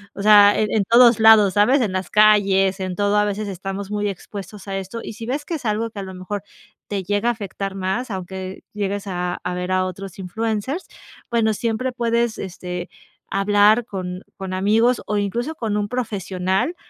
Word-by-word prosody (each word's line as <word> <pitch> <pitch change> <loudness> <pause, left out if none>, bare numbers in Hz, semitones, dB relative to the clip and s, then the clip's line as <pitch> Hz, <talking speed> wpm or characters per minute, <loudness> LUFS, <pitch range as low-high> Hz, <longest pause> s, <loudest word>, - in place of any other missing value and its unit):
o - - -5
sea, 205 -1 +7
e 215 - +2
en 215 -1 +1
todos 235 +2 +6
lados, 220 -3 +7
¿sabes? 250 +7 +4
En 215 -5 0
las 185 -1 -3
calles, 200 -2 +4
en 185 -1 -3
todo, 205 +1 +1
a 210 - +3
veces 210 0 -3
estamos 195 +1 -5
muy 205 -1 -1
expuestos 200 +1 -8
a 195 0 -3
esto, 195 +4 -6
y - - -6
si 225 +1 -8
ves 280 +4 -2
que 340 - -3
es 285 - -7
algo 220 +1 0
que 205 - -8
a - - -4
lo 190 -1 -8
mejor 190 +2 -5 0.4
te 200 -2 -3
llega 205 +5 0
a - - +4
afectar 195 -2 -5
más, 195 +6 -2
aunque 190 0 -6
llegues 205 -1 -3
a 180 -1 -3
a 180 - -2
ver 180 +1 -3
a 185 0 +2
otros 190 0 -7
influencers, 220 - -3 0.4
bueno, 230 -2 +2
siempre 230 +4 -2
puedes, 235 -1 0
este, 180 -1 -6 0.4
hablar 205 +3 +4
con 185 -3 -5 0.2
con 190 -1 -5
amigos 220 +6 +2
o 210 - -1
incluso 235 +9 -2
con 225 -7 -2
un 205 0 -2
profesional 195 - -1
205 Hz, 195 wpm, -21 LUFS, 190-220 Hz, 0.4 s, sea